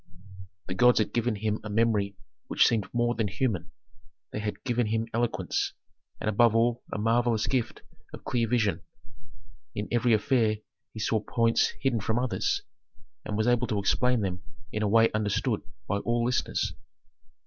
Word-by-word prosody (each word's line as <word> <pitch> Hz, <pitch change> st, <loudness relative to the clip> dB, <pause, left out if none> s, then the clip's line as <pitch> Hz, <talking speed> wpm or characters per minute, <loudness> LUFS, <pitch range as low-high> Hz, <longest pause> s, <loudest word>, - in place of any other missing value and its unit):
The 90 Hz, -, -4 dB
gods 125 Hz, +6 st, +5 dB
had 110 Hz, -, +1 dB
given 120 Hz, -1 st, +1 dB
him 105 Hz, +1 st, -1 dB
a 105 Hz, -, -6 dB
memory 105 Hz, -2 st, +1 dB, 0.3 s
which -, -, +4 dB
seemed 110 Hz, -5 st, 0 dB
more 120 Hz, 0 st, +1 dB
than 110 Hz, -3 st, -1 dB
human; 100 Hz, -4 st, -1 dB, 0.6 s
they -, -, -4 dB
had 105 Hz, 0 st, -4 dB
given 120 Hz, -3 st, 0 dB
him 110 Hz, +1 st, -1 dB
eloquence, 110 Hz, -7 st, -1 dB, 0.5 s
and -, -, -4 dB
above 110 Hz, +2 st, +4 dB
all 120 Hz, +1 st, +2 dB
a -, -, -2 dB
marvellous 115 Hz, +1 st, +2 dB
gift 125 Hz, -4 st, -2 dB, 0.3 s
of -, -, -10 dB
clear 115 Hz, -2 st, 0 dB
vision. 110 Hz, -4 st, +1 dB, 0.9 s
In 105 Hz, -, -3 dB
every 120 Hz, 0 st, +3 dB
affair 110 Hz, -2 st, +2 dB, 0.3 s
he 110 Hz, -, -9 dB
saw 110 Hz, +1 st, +1 dB
points 115 Hz, +2 st, +1 dB
hidden 130 Hz, -4 st, +1 dB
from 110 Hz, +3 st, -1 dB
others, 125 Hz, -1 st, 0 dB, 0.6 s
and 105 Hz, -, -3 dB
was 110 Hz, -, +1 dB
able 120 Hz, 0 st, +2 dB
to 110 Hz, -3 st, -1 dB
explain 125 Hz, +4 st, +2 dB
them 90 Hz, -2 st, -2 dB, 0.3 s
in 105 Hz, -, -2 dB
a 105 Hz, -, +2 dB
way 115 Hz, +2 st, +5 dB
understood 105 Hz, +2 st, 0 dB, 0.3 s
by 100 Hz, -, 0 dB
all 120 Hz, +3 st, 0 dB
listeners. 125 Hz, 0 st, 0 dB
115 Hz, 165 wpm, -28 LUFS, 105-120 Hz, 0.9 s, gods